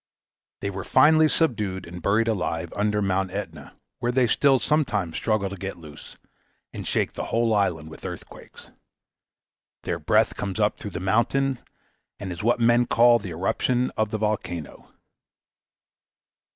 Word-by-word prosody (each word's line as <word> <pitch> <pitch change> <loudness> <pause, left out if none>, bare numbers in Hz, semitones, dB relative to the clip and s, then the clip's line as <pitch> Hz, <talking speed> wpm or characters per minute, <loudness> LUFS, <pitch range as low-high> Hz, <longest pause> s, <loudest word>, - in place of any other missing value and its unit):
They 100 - -2
were 95 -1 -5
finally 155 +1 +5
subdued 105 - -1
and 90 +1 -9
buried 105 +6 +2
alive 85 -6 -2
under 105 0 0
Mount 95 -1 0
Aetna, 100 +1 -7 0.2
where 120 - 0
they 130 0 +3
still 135 +3 +3
sometimes 120 - 0
struggle 110 -3 0
to - - -5
get 95 -1 -6
loose, 75 -3 -12 0.6
and - - -6
shake - - 0
the - - -4
whole 115 -1 +1
island 90 -7 0
with - - -12
earthquakes. - - -10 1.1
Their - - -3
breath - - +2
comes 100 +1 -4
up 105 0 +1
through 105 - -6
the - - -3
mountain, 120 +7 +1 0.6
and 95 -3 -5
is 85 - -6
what 120 +3 +2
men 120 +1 +3
call 120 0 +5
the 100 - -7
eruption 120 +9 0
of 110 -1 0
the 110 - -2
volcano. 100 -7 -4
105 Hz, 150 wpm, -24 LUFS, 95-120 Hz, 1.1 s, finally